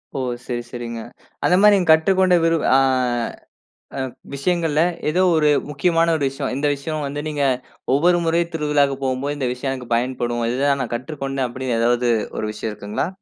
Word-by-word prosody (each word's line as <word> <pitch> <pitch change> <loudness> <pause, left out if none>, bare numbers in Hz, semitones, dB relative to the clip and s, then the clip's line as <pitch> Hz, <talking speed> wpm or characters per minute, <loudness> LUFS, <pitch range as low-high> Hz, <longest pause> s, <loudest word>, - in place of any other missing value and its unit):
ஓ! - - -1 0.3
சரி, 120 -1 -3
சரிங்க. 120 -2 -5 0.5
அந்த 180 - +4
மாரி 210 0 +7
நீங்க 180 -4 0
கற்றுக்கொண்ட 185 +2 +3
விரு 165 0 +3 0.2
ஆ, - - +7 1.2
அ, - - -1 0.3
விஷயங்கள்ல 160 +1 +1 0.3
ஏதோ 180 +4 +2
ஒரு 150 -1 +3 0.2
முக்கியமான 165 +3 +2
ஒரு 145 - -2
விஷயம். 135 -1 -4
இந்த 145 +1 0
விஷயம் 150 +1 -4
வந்து 145 +1 -4
நீங்க, 145 -2 -1 0.5
ஒவ்வொரு 175 +4 +4
முறையும் 170 +1 +1
திருவிழாவுக்கு 145 -3 +1
போம்போது, 135 +3 -2
இந்த 130 -3 -1
விஷயம் 135 +1 -3
எனக்கு 125 -2 -3
பயன்படும். 120 -1 -1
இது 125 - -2
தான் 140 -1 +2
நான் 120 - -5
கற்றுக்கொண்டேன், 135 0 -3
அப்படின்னு 125 -1 -3
ஏதாவது 120 +1 +2 0.3
ஒரு - - -2
விஷயம் 110 - -4
இருக்குங்களா? 105 - -3
140 Hz, 170 wpm, -21 LUFS, 125-160 Hz, 1.2 s, மாரி